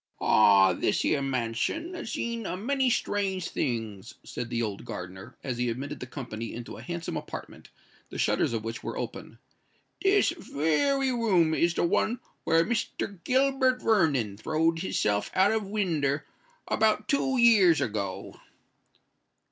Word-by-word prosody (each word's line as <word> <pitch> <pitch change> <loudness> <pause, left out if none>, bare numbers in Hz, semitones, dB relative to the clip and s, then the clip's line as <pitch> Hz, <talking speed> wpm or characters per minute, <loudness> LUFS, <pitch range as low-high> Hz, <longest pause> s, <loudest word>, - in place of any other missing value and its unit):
"Ah! 100 -3 +5
this - - 0
here 140 - +1
mansion 135 - -2
has 335 -9 -6
seen 235 -2 -3
a 180 - -3
many 265 +5 +1
strange 195 -5 -1
things," 110 -6 -3
said 120 - -6
the 120 -1 -1
old 105 -3 -4
gardener, 95 +6 -8
as 125 -3 -3
he 125 0 +1
admitted 140 +5 -5
the 125 - -7
company 115 -4 -6
into 120 0 -7
a - - -10
handsome 170 -1 -5
apartment, - - -8 0.4
the - - -8
shutters - - +1
of 115 -2 -2
which 115 +1 -5
were - - -5
open: - - -6 0.6
"this 395 -3 +3 0.2
wery 265 - +2
room 190 -10 +2
is 170 +1 +2
the - - +1
one 220 +7 +1 0.3
where 165 +1 +4
Mr. 200 -4 -3
Gilbert 260 -1 +2
Vernon 145 - +2
throwed 160 +7 0
his 190 - -2
self 105 0 +1
out 190 +2 +4
of 220 -2 -1
winder 160 -9 0 0.4
about 215 -1 +2
two 270 0 +1
years 210 -9 +6
ago." 100 -4 -4
165 Hz, 150 wpm, -28 LUFS, -, 0.6 s, years